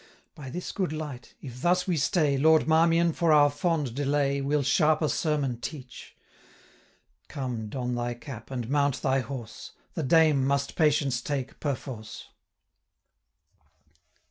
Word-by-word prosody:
By 140 -3 -9
this 175 +7 -5
good 185 -5 -2
light! 150 -5 -7
if 125 -3 -9
thus 180 +2 +2
we 180 - 0
stay, 150 0 +2
Lord 155 +3 +4
Marmion, 165 +1 +3
for 170 -1 +1
our 145 -1 +6
fond 150 -4 -1
delay, 140 0 0
935 - - -4
Will 145 0 +1
sharper 155 +3 +3
sermon 145 -7 -1
teach. 130 -3 -9 1.1
Come, 125 -6 -5
don 125 +1 -3
thy 120 0 -2
cap, 120 -2 -10
and 125 -4 -4
mount 140 0 0
thy 135 -1 +2
horse; 120 -3 -7 0.2
The 160 - -3
Dame 155 -1 +4
must 140 +1 0
patience 145 -5 +2
take 135 -2 -4
perforce.' 130 -6 -5
140 Hz, 140 wpm, -27 LUFS, 130-155 Hz, 1.1 s, our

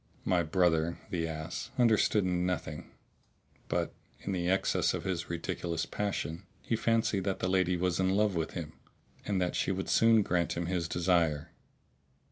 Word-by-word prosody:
My 90 -2 +3
brother 85 0 +2
(the 85 -2 -1
ass!) 80 -1 -5
understood 110 -4 +4
nothing; 90 0 -2 0.8
but, - - -1 0.3
in 100 - -3
the 90 -2 0
excess 95 +1 +2
of - - -4
his 90 -3 -3
ridiculous 85 -1 -2
passion, 90 -4 -3 0.2
he 115 - 0
fancied 115 -3 +1
that 95 -2 0
the - - -1
lady 90 -1 +2
was 90 0 0
in 95 0 +2
love 105 -1 +3
with 80 -2 -2
him 80 -3 -5 0.5
and 100 -2 +1
that 90 -1 0
she - - +1
would 95 0 -3
soon 115 -1 +5
grant 90 -3 0
him 85 - -1
his 85 -1 -1
desire. 85 -3 +1
90 Hz, 160 wpm, -31 LUFS, 85-95 Hz, 0.8 s, soon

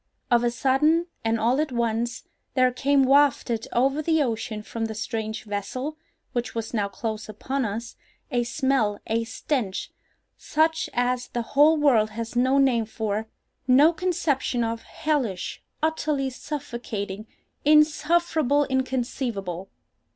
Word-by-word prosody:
Of 240 0 +4
a 240 - +3
sudden, 290 +7 +2 0.2
and 225 0 +1
all 245 +6 +2
at 310 - -2
once, 235 0 -1 0.3
there 255 -1 +4
came 275 +2 +3
wafted 265 -4 +3
over 270 +5 +2
the 320 -1 +2
ocean 225 -3 -3
from 225 +1 -4
the 220 -1 -5
strange 220 0 -3
vessel 220 +8 -4 0.4
(which 240 -2 -2
was 225 0 -4
now 205 -3 +1
close 215 +2 -5
upon 260 +5 -2
us) 225 +3 -5 0.3
a 245 -2 +1
smell, 235 -5 +1
a 230 +1 0
stench, 225 -3 -2 0.5
such 315 +1 +1
as 245 0 0
the 240 - -3
whole 300 +3 +6
world 245 -8 +4
has 230 +2 -6
no 260 +3 +3
name 255 -5 +3
for—no 225 +7 +1
conception 315 -8 0
of—hellish—utterly 275 - -2
suffocating—insufferable, 290 - 0
inconceivable. 240 -8 -2
245 Hz, 120 wpm, -25 LUFS, 225-285 Hz, 0.5 s, whole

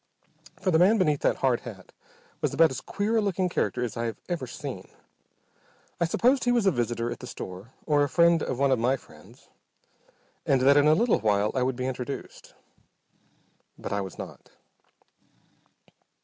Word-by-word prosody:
For 185 - 0
the 160 - +4
man 200 +6 +5
beneath 150 -7 +2
that - - +2
hard 130 -3 +1
hat 105 -6 -11 0.5
was - - -1
about 165 -2 +5
as 130 - -5
queer 215 +3 -1
a - - +3
looking 190 -3 0
character 125 -6 -1
as 115 -4 -4
I 115 - -2
have 115 -3 -4
ever 170 -8 -3
seen. - - -7 1.1
I 170 - +2
supposed 250 +10 +2
he 245 - +3
was 240 -4 +2
a 195 - +5
visitor 120 -3 -2
at - - -6
the 125 - -9
store, 95 +2 -9
or 145 -2 +2
a 145 - +1
friend 170 0 +4
of 130 - -3
one 140 0 +2
of 130 - +2
my 125 +4 +2
friends, - - -18 0.9
and 135 -2 +2
that 140 +2 +5
in 145 +1 +5
a 155 - +6
little 235 +6 +2
while 105 -1 +1
I 130 - 0
would 130 0 0
be 125 +1 -3
introduced. 130 +1 -6 1.2
But - - -5
I 100 - 0
was 95 -2 -7
not. - - -10
135 Hz, 185 wpm, -27 LUFS, 120-170 Hz, 1.2 s, a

